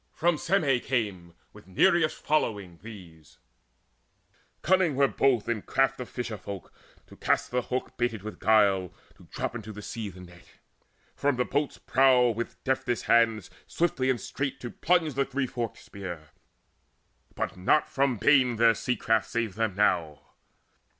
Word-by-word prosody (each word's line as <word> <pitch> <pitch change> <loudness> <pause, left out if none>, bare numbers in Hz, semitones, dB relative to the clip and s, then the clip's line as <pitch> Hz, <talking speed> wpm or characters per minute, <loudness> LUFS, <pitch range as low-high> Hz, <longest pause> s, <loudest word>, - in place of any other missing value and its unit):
From 170 -1 +1
Syme 155 -9 +2
came 100 -10 -3 0.2
With - - -16
Nireus' 165 - +3
following 100 - -1
these: 90 -8 -13 1.3
cunning 185 -4 +3
were 140 +1 +4
both 130 -5 +1
In 115 -3 -1
craft 135 +3 0
of 125 - -6
fisher 120 -3 -5
folk 95 +1 -8 0.3
to - - -17
east - - 0
the 125 0 +1
hook 125 +1 -4
Baited 120 -4 -1
with 110 - -8
guile, 100 -4 +3 0.3
to - - -18
drop - - -4
into 110 -2 -7
the 105 0 -9
sea 110 -1 -5
The 90 -1 -12
net, 90 -1 -15 0.7
from 145 -1 +1
the 125 0 0
boat's 145 0 -1
prow 130 -2 +4
with 115 +1 -6
deftest 130 -3 -1
hands 110 -5 +2 0.2
Swiftly 135 -6 0
and 125 -2 +1
straight 140 -1 -4
to 120 - -6
plunge 170 -4 +1
the 140 +2 +1
three 135 0 -2
forked 120 -3 -4
spear. 85 -6 -9 1.1
But - - -3
not 95 +12 +2
from 135 -3 0
bane 125 +2 +4
their 115 0 +5
sea 125 +3 -2
craft 110 -1 0
saved 115 -4 -2
them 110 -3 -1
now. 85 -7 +1
115 Hz, 155 wpm, -27 LUFS, 100-135 Hz, 1.3 s, their